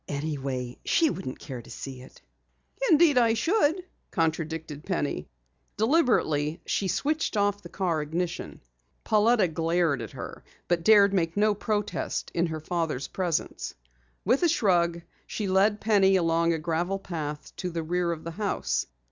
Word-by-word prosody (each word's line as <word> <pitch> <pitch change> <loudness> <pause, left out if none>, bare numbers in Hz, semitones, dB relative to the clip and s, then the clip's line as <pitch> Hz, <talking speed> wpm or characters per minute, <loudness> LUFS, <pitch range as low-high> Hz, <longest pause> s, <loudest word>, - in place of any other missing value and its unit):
"Anyway, 135 -4 -3
she 325 -3 +3
wouldn't 135 -9 -5
care 125 -3 -7
to - - -16
see 130 -2 -7
it." 130 - -16 0.7
"Indeed, 310 -5 +6
I 230 -2 +3
should," 345 - +1 0.2
contradicted 160 -2 -2
Penny. 145 - -2 0.5
Deliberately 210 - +2
she 195 - 0
switched 300 - 0
off 205 0 +1
the 175 - -11
car 170 -4 -1
ignition. 165 +3 -4 0.4
Pauletta 215 -1 +4
glared 165 -3 +1
at 110 - -6
her, - - -8 0.2
but 170 -1 +1
dared 200 0 +6
make 170 -1 0
no 210 +1 +4
protest 210 0 -2
in 170 +1 +1
her 160 -1 -4
father's 155 -4 -2
presence. 175 -4 -2 0.5
With 270 - +3
a 345 - +4
shrug 170 - +2 0.2
she 210 - -3
led 200 +3 +3
Penny 195 -3 +4
along 170 -1 +2
a 165 - +1
gravel 170 +4 -1
path 150 -6 -6
to 180 - -3
the 165 -1 -3
rear 175 +1 0
of 160 -2 -5
the 165 - -5
house. 160 - -1
175 Hz, 150 wpm, -27 LUFS, 160-205 Hz, 0.7 s, Indeed